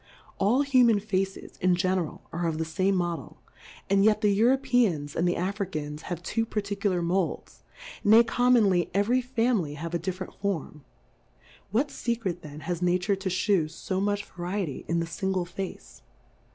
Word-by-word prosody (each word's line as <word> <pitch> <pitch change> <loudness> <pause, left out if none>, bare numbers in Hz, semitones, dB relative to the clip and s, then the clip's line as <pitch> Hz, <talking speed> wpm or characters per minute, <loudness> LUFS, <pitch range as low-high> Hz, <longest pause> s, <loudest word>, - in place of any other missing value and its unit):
All 235 +8 +3
Human 250 -6 +4
Faces, 195 -2 -3
in 185 0 +4
general, 185 -2 -1
are 170 +1 -1
of 160 -1 -1
the 160 - -1
fame 185 +5 +1
Model, 175 -5 -3 0.5
and 195 0 +3
yet 215 0 +4
the 210 - +4
Europe 255 +5 +2
am 240 -7 +5 0.2
and 170 - +1
tiiQ - - +3
Jfricans 175 -6 -3
have 175 -1 -4
two 225 +6 0
particu 205 -2 -2
lar 180 -2 0
Moulds, 180 +1 -2 0.4
nay, 220 +3 +7
commonly 225 -7 +3
every 230 +6 +3
Fa 250 -1 +1
mily 160 -9 -1
have 165 +3 -6
a 170 - 0
different 185 +2 -5
Form; 170 -7 -4 0.9
what 265 +8 0
Se. 235 -1 -1
cret 185 -7 -4
then 150 -1 -9
has 175 +3 -3
Nature 180 +3 +2
to 190 0 -3
fhew 185 -3 +1 0.2
fo 190 -1 0
much 205 0 0
f - - -20
Variety 180 -4 -3
in 170 0 +1
the 165 - -1
fingle 185 +2 -2
Face 175 - -7
190 Hz, 175 wpm, -27 LUFS, 175-210 Hz, 0.9 s, nay